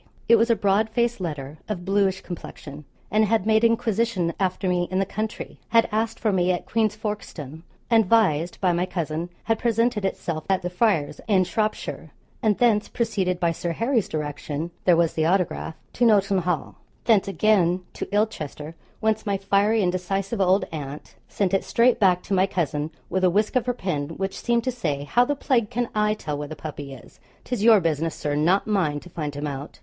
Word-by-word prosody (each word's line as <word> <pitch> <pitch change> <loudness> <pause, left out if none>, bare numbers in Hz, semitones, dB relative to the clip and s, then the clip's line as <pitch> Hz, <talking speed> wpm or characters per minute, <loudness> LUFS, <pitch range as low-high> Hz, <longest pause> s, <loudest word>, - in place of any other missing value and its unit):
It 230 - +7
was 230 +2 +2
a 230 - +5
broad 205 +2 +2
faced 235 -2 0
letter, 150 -3 -5
of 180 -4 -4
bluish 195 -1 +1
complexion, 150 -4 -9 0.3
and 215 +2 +4
had 215 -1 +1
made 220 +1 +3
inquisition 230 -6 +1
after 185 0 -1
me 180 -1 +1
in 185 - -1
the 195 - +2
country 215 +2 -5
had 230 0 +4
asked 220 +1 -1
for 215 - +1
me 185 -1 +2
at 175 - -2
Queen's 220 -2 0
Folkstone; 170 -9 -6 0.3
and, 225 -4 +4
vised 180 -7 +2
by 185 -2 +2
my 175 +2 0
cousin, 170 -1 -3
had 225 0 0
presented 230 -2 +1
itself 165 -4 -2
at 190 -2 +1
the 180 - -3
Friars, 180 -7 +1
in 195 -4 +4
Shropshire, 215 +3 -3 0.3
and 215 -4 +2
thence 225 -4 +2
proceeded 195 -6 -1
by 170 -1 +2
Sir 170 +1 -3
Harry's 230 - 0
direction 150 +1 -4
(there 175 -2 +5
was 170 -1 +2
the 155 - 0
autograph) 180 -3 0 0.2
to 245 - -1
Nolton 200 -4 +4
Hall; 175 -2 -2 0.3
thence 215 -5 +4
again 190 -3 +2
to - - -6
Ilchester, 165 -8 -2 0.3
whence 220 0 0
my 200 -1 +1
fiery 200 +2 +2
and 180 - +2
decisive 195 +3 -2
old 190 +1 +3
aunt 145 -2 -7 0.2
sent 195 -2 -1
it 195 - +2
straight 240 +1 +3
back 180 -3 +3
to - - -3
my 190 0 +3
cousin, 150 -4 -2 0.2
with 185 +1 -1
a 185 - +6
whisk 210 +7 +1
of 255 -1 +1
her 245 - +2
pen 150 -10 -2
which 195 0 -3
seemed 235 -1 +1
to 255 - 0
say, 150 - -2
'How 240 +12 +3
the 290 - -1
plague 245 -6 +1
can 240 +1 -2
I 210 0 +2
tell 150 -7 -4
where 145 - -4
the 155 - -7
puppy 145 -3 -7
is? 135 -3 -13 0.2
'tis 245 -5 -3
your 225 -2 +7
business, 165 -1 -1
Sir, 145 - -3
not 170 +7 +2
mine, 175 -9 0
to 180 - -13
find 150 -4 -4
him 145 +1 -4
out!' 140 0 -6
195 Hz, 200 wpm, -24 LUFS, 165-220 Hz, 0.3 s, It